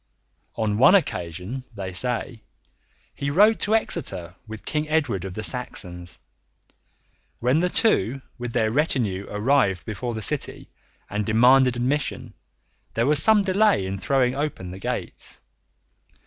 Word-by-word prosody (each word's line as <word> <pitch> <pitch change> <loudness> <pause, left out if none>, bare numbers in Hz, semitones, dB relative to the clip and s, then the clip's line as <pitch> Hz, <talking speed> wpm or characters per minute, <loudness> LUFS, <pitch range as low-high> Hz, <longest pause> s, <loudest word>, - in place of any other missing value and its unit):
On 110 -2 -1
one 135 +10 +7
occasion, 90 - -2
they 95 -2 -5
say, 120 +3 -1 0.7
he 140 - -3
rode 210 +9 +4
to 215 +2 +2
Exeter 90 - -2
with 110 0 -9
King 150 0 -2
Edward 130 - 0
of 95 -1 -7
the 110 - -4
Saxons. 90 -8 -5 1.2
When 125 +6 +2
the 180 +1 +1
two 135 - +2 0.2
with 120 -1 -4
their 110 -2 +1
retinue 115 - 0
arrived 105 -3 +1
before 115 +2 -4
the 110 - -4
city - - -1 0.4
and 105 +1 -2
demanded 125 +4 +4
admission, 130 +4 -2 0.6
there 115 - +1
was 145 +1 +3
some 220 -2 +5
delay 195 - +2
in 95 +1 -4
throwing 130 +2 +1
open 135 -11 -4
the 95 - -8
gates. - - -5
120 Hz, 135 wpm, -24 LUFS, 100-145 Hz, 1.2 s, one